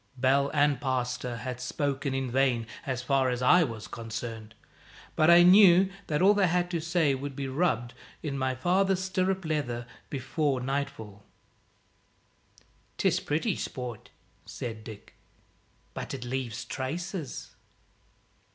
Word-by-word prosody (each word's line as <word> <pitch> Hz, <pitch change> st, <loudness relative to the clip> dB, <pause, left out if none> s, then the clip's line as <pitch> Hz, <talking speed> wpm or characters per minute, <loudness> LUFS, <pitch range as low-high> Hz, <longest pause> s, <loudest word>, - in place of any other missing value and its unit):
Bell 135 Hz, +2 st, +3 dB
and 145 Hz, -3 st, +2 dB
pastor 125 Hz, -2 st, -2 dB
had 125 Hz, +1 st, -5 dB
spoken 140 Hz, +1 st, -2 dB
in 135 Hz, -2 st, -2 dB
vain, 130 Hz, -3 st, +2 dB, 0.2 s
as 125 Hz, -2 st, -2 dB
far 135 Hz, 0 st, +2 dB
as 125 Hz, 0 st, -2 dB
I 175 Hz, +7 st, +6 dB
was 115 Hz, -7 st, -5 dB
concerned; 115 Hz, -1 st, -7 dB, 0.6 s
but 155 Hz, -, +4 dB
I 170 Hz, 0 st, +8 dB
knew 190 Hz, 0 st, +7 dB, 0.2 s
that 150 Hz, +3 st, 0 dB
all 200 Hz, +2 st, +7 dB
they 200 Hz, -2 st, +3 dB
had 175 Hz, +1 st, 0 dB
to 170 Hz, -2 st, -1 dB
say 165 Hz, -3 st, +2 dB
would 135 Hz, +1 st, -5 dB
be 140 Hz, 0 st, -3 dB
rubbed 130 Hz, -5 st, 0 dB, 0.3 s
in 150 Hz, -3 st, -3 dB
with 140 Hz, -, -3 dB
my 130 Hz, -1 st, 0 dB
father's 185 Hz, +6 st, +1 dB
stirrup 185 Hz, 0 st, -1 dB
leather 125 Hz, -7 st, -2 dB, 0.2 s
before 135 Hz, +1 st, -1 dB
nightfall. 130 Hz, -6 st, -4 dB, 1.8 s
"'Tis -, -, +2 dB
pretty 165 Hz, +8 st, -1 dB
sport," 125 Hz, -4 st, -6 dB, 0.3 s
said 110 Hz, -2 st, -7 dB
Dick, 110 Hz, -2 st, -11 dB, 0.8 s
"but -, -, -5 dB
it 125 Hz, -2 st, -7 dB
leaves 120 Hz, -2 st, -4 dB
traces." 165 Hz, +3 st, -5 dB
135 Hz, 135 wpm, -28 LUFS, 125-170 Hz, 1.8 s, I